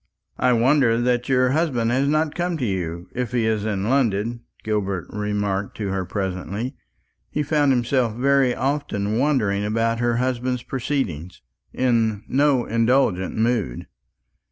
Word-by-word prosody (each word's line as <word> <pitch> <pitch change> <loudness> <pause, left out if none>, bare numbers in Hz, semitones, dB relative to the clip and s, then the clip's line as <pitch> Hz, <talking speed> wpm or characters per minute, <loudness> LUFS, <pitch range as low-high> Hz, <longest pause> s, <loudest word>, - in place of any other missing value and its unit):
"I 125 - +3
wonder 120 -1 +3
that 125 0 0
your 130 -1 +3
husband 135 -7 +1
has 135 +3 +2
not 155 +1 +1
come 175 -1 -1
to 130 - -2
you, 90 -3 -3
if 125 -1 -3
he 120 -2 +1
is 110 -1 0
in 100 -2 -1
London," 115 -3 +1 0.2
Gilbert 100 -4 -1
remarked 105 -1 -2
to 105 -3 -3
her 95 -1 -2
presently. 100 +7 -4 0.5
He 150 - -1
found 145 -1 +2
himself 120 -2 +1
very 135 0 +3
often 120 -6 -1
wondering 110 -9 +1
about 115 +2 0
her 120 0 +1
husband's 125 0 -1
proceedings, 110 - -3 0.3
in 115 -5 +1
no 135 -2 +2
indulgent 115 -5 +1
mood. 110 - 0
120 Hz, 140 wpm, -22 LUFS, 105-130 Hz, 0.5 s, I